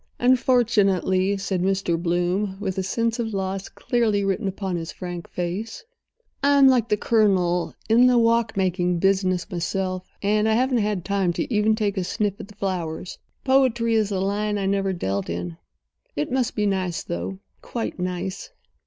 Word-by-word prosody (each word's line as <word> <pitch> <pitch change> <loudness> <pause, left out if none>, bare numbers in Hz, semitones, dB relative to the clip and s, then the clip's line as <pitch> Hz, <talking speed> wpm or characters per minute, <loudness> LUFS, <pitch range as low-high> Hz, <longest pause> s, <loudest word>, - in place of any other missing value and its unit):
"Unfortunately," 205 -7 +2
said 195 -2 -2
Mr. 190 -2 +1
Bloom, 175 +3 -1
with 190 -2 -2
a - - +1
sense 230 +5 -1
of 230 -1 -1
the 205 - -3
loss 190 0 -3
clearly 220 -4 0
written 195 +2 -1
upon 190 -1 -3
his 165 -1 -4
frank 175 -2 -7
face, 185 - -4 0.6
"I'm 280 -1 +5
like 245 -3 +3
the 210 - +2
Colonel—in 205 +2 +2
the 250 -1 +4
walk 230 -2 +2
making 180 -2 +1
business 185 -1 +1
myself—and 190 +4 -1
I - - +3
haven't 250 +1 +2
had 205 -4 -1
time 195 -3 +1
to 235 - -3
even 215 +1 +3
take 210 -2 -1
a 190 - 0
sniff 200 +2 -2
at - - -8
the 205 - -16
flowers. 180 -4 -4 0.2
Poetry 255 -4 +3
is 215 -2 +2
a 190 - -1
line 205 +2 -1
I 195 - -2
never 195 0 +1
dealt 100 - -2
in. 85 -1 -4 0.6
It 145 +8 -2
must 255 -2 0
be 210 - +1
nice, 185 -4 -1
though—quite 95 - -6
nice." 180 +1 -4
195 Hz, 160 wpm, -23 LUFS, 180-220 Hz, 0.6 s, I'm